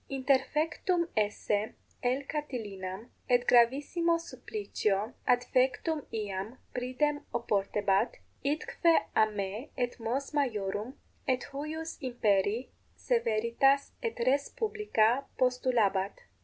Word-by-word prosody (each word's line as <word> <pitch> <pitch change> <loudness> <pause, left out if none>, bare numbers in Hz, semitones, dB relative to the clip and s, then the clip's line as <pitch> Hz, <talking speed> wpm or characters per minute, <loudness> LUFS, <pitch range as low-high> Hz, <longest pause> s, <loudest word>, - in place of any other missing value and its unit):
Interfectum 300 +6 +1
esse 210 0 0 0.3
L. 255 +3 +1
Catilinam 210 -9 -4 0.2
et 245 0 +4
gravissimo 285 +8 +4
supplicio 215 -7 -2
adfectum 255 +5 +2
iam 210 +2 -4 0.2
pridem 255 +4 0
oportebat, 205 -1 +1 0.3
idque 315 +3 +2
a 215 - +5
me 210 +5 -4
et 245 -1 -1
mos 250 +5 -2
maiorum 225 -4 -1 0.3
et 255 -2 +1
huius 315 +3 -5
imperii 220 -2 +1 0.3
severitas 270 - +2
et 460 - -3
res 280 +2 +2
publica 280 - +1
postulabat. 235 -6 +1
250 Hz, 90 wpm, -30 LUFS, 215-285 Hz, 0.3 s, a